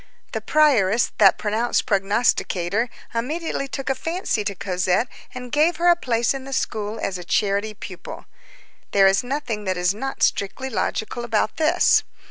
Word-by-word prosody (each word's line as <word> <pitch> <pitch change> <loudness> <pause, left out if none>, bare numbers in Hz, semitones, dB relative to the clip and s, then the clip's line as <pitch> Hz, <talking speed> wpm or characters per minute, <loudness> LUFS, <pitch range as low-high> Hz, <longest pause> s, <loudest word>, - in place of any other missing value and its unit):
The - - -3
prioress, 245 -8 +3
that 195 -3 +6
pronounced 220 +3 0
prognosticator, 200 0 +1 0.2
immediately 275 +4 -2
took 275 0 -6
a 270 - +2
fancy 325 - -2
to 200 -1 -2
Cosette 185 +4 0 0.3
and 250 -1 -7
gave 310 +4 +3
her 350 +1 +3
a 345 - +6
place 235 -7 0
in 270 -1 -6
the 270 +1 -7
school 215 -3 -2
as 185 -2 -3
a - - -7
charity 205 +4 0
pupil. - - -9 0.7
There 195 -1 +6
is 195 +2 +4
nothing 245 -5 -3
that 185 -1 -1
is 180 +1 +2
not 270 +6 -4
strictly 260 +7 0
logical 225 +1 -2
about 220 -2 0
this. 315 -1 +4
225 Hz, 160 wpm, -22 LUFS, 200-270 Hz, 0.7 s, that